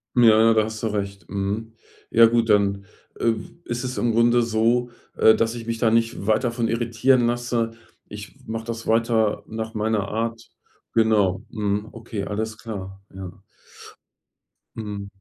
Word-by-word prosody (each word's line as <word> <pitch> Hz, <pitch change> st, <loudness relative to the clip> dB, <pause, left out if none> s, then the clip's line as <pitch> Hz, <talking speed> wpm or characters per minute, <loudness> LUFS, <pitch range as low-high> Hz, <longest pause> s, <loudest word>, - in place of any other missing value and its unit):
Ja, 120 Hz, -, +5 dB, 0.2 s
ja, 115 Hz, 0 st, +6 dB
da 110 Hz, -1 st, +3 dB
hast 110 Hz, -1 st, -6 dB
du -, -, +1 dB
recht, 100 Hz, -2 st, -4 dB
mhm. 105 Hz, +3 st, -3 dB, 0.4 s
Ja 115 Hz, 0 st, +7 dB
gut, 115 Hz, 0 st, +2 dB
dann, 100 Hz, -1 st, +2 dB, 0.3 s
äh, 115 Hz, -1 st, +3 dB, 0.3 s
ist 120 Hz, +1 st, -3 dB
es 125 Hz, 0 st, -4 dB
im 120 Hz, -, +1 dB
Grunde 120 Hz, +1 st, +4 dB
so, 115 Hz, +2 st, +1 dB, 0.3 s
äh, 110 Hz, -, +6 dB
dass 115 Hz, 0 st, 0 dB
ich 115 Hz, -1 st, -8 dB
mich 115 Hz, 0 st, -2 dB
da 115 Hz, -2 st, +3 dB
nicht 115 Hz, -3 st, 0 dB
weiter 110 Hz, +3 st, +2 dB
von 115 Hz, -1 st, -1 dB
irritieren 120 Hz, +2 st, +2 dB
lasse. 120 Hz, -1 st, -1 dB, 0.4 s
Ich 105 Hz, +3 st, -10 dB
mache 115 Hz, 0 st, -4 dB
das 115 Hz, -1 st, -5 dB
weiter 115 Hz, -1 st, +2 dB
nach 110 Hz, 0 st, -5 dB
meiner 105 Hz, -2 st, 0 dB
Art. 115 Hz, +2 st, -3 dB, 0.5 s
Genau. 105 Hz, -4 st, +2 dB
Mhm. 105 Hz, 0 st, -2 dB
Okay, 115 Hz, -3 st, -6 dB
alles 110 Hz, +1 st, -3 dB
klar. 95 Hz, -4 st, -8 dB
Ja. 95 Hz, 0 st, -9 dB, 1.3 s
Mhm. 105 Hz, -2 st, -5 dB
110 Hz, 160 wpm, -23 LUFS, 105-115 Hz, 1.3 s, Ja